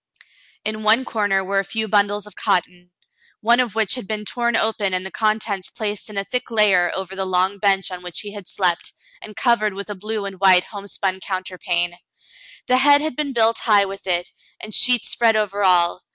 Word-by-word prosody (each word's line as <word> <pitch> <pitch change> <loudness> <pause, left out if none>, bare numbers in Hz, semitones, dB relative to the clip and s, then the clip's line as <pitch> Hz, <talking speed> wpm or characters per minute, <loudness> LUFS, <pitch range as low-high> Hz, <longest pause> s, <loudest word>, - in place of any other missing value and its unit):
In 215 0 -3
one 220 +4 +4
corner 205 -4 0
were 195 +1 0
a - - 0
few 220 +3 -2
bundles 205 0 +1
of 210 -2 -13
cotton, 180 0 -1 0.5
one 235 +3 +3
of 240 -5 0
which 220 -3 +1
had 250 -6 -4
been 215 -1 -4
torn 235 +1 -1
open 210 -4 0
and 185 +1 -2
the 190 - -6
contents 215 -3 -1
placed 210 -1 -4
in 210 - -9
a 200 - 0
thick 250 +6 -4
layer 200 -6 +3
over 190 0 -5
the 190 - -2
long 185 +2 0
bench 195 -1 +1
on 180 -1 -7
which 180 -1 -4
he 205 - -8
had 200 -3 -9
slept, 180 -3 -1 0.3
and 215 - -10
covered 220 -3 +1
with 200 +1 -6
a - - -5
blue 210 +2 -4
and 195 -1 -6
white 185 -2 +5
homespun 200 -2 -4
counter 185 -1 -5
pane. 175 0 -1 0.7
The 255 - +3
head 285 +2 +5
had 310 -4 -3
been 295 -1 -2
built 230 -2 +2
high 205 -3 +4
with 195 0 -9
it, 175 -1 0 0.3
and 215 - -8
sheets 250 +1 +3
spread 230 -2 +2
over 205 -1 -1
all. 180 -1 +3
205 Hz, 210 wpm, -21 LUFS, 190-220 Hz, 0.7 s, white